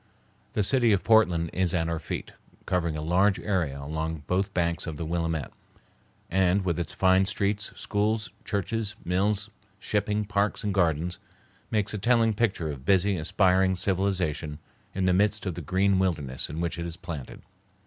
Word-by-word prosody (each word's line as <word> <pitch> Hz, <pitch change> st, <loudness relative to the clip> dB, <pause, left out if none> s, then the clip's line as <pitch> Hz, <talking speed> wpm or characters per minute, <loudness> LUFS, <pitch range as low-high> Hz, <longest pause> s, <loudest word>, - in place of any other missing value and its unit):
The 105 Hz, -, +1 dB
city 120 Hz, +1 st, +4 dB
of 95 Hz, -, +1 dB
Portland 90 Hz, -7 st, +4 dB
is 90 Hz, -2 st, +1 dB
at 80 Hz, -1 st, +1 dB
our 85 Hz, -1 st, -2 dB
feet, -, -, -5 dB, 0.3 s
covering 85 Hz, -3 st, 0 dB
a 75 Hz, -, -4 dB
large 95 Hz, +5 st, +3 dB
area 90 Hz, -9 st, -1 dB
along 80 Hz, +2 st, -4 dB
both 95 Hz, +2 st, 0 dB
banks 85 Hz, -1 st, -1 dB
of 80 Hz, -2 st, -4 dB
the 80 Hz, -, -4 dB
Willamette, 80 Hz, -2 st, -2 dB, 0.7 s
and, 95 Hz, +1 st, +2 dB
with 85 Hz, -2 st, 0 dB
its 85 Hz, -, -2 dB
fine 95 Hz, 0 st, +3 dB
streets, 100 Hz, +1 st, -1 dB
schools, 105 Hz, -1 st, -1 dB
churches, 105 Hz, 0 st, -2 dB
mills, 100 Hz, +3 st, 0 dB, 0.3 s
shipping, 105 Hz, +1 st, -1 dB
parks, 100 Hz, 0 st, 0 dB
and 105 Hz, -2 st, 0 dB
gardens, 85 Hz, -1 st, +1 dB, 0.5 s
makes 105 Hz, -1 st, 0 dB
a 105 Hz, -, -3 dB
telling 115 Hz, 0 st, +3 dB
picture 100 Hz, -8 st, 0 dB
of 65 Hz, -3 st, -8 dB
busy, 95 Hz, +4 st, +3 dB
aspiring 95 Hz, +3 st, +2 dB
civilization 90 Hz, -6 st, 0 dB, 0.4 s
in 95 Hz, -1 st, 0 dB
the 90 Hz, -, +4 dB
midst 105 Hz, +3 st, +2 dB
of 90 Hz, -, -1 dB
the 85 Hz, -, -6 dB
green 95 Hz, +4 st, +2 dB
wilderness 75 Hz, -8 st, -1 dB
in 75 Hz, +3 st, -5 dB
which 85 Hz, 0 st, -2 dB
it 85 Hz, -, -3 dB
is 85 Hz, 0 st, -7 dB
planted. 80 Hz, -8 st, -7 dB
95 Hz, 170 wpm, -27 LUFS, 85-100 Hz, 0.7 s, city